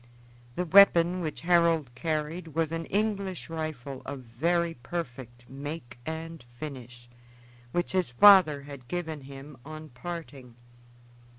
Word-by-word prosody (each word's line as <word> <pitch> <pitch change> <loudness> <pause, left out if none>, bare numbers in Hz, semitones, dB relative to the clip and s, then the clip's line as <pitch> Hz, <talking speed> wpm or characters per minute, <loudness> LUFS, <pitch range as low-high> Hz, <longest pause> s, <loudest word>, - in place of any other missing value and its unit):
The 180 - -1
weapon 180 0 +6
which 155 -3 -4
Harold 165 -6 +3
carried 155 +4 -3
was 165 -1 0
an 165 0 -3
English 200 -4 -2
rifle 145 -5 -5
of 140 -2 -6
very 165 +8 0
perfect 125 -4 -7
make 135 -2 -7
and 160 -1 -6 0.2
finish, 125 -5 -8 0.6
which 175 +5 -1
his 185 -5 +1
father 155 0 +7
had 140 -3 -11
given 160 -3 -4
him 135 +1 -11
on 155 +1 -9
parting. 140 -4 -8
155 Hz, 120 wpm, -28 LUFS, 135-170 Hz, 0.6 s, father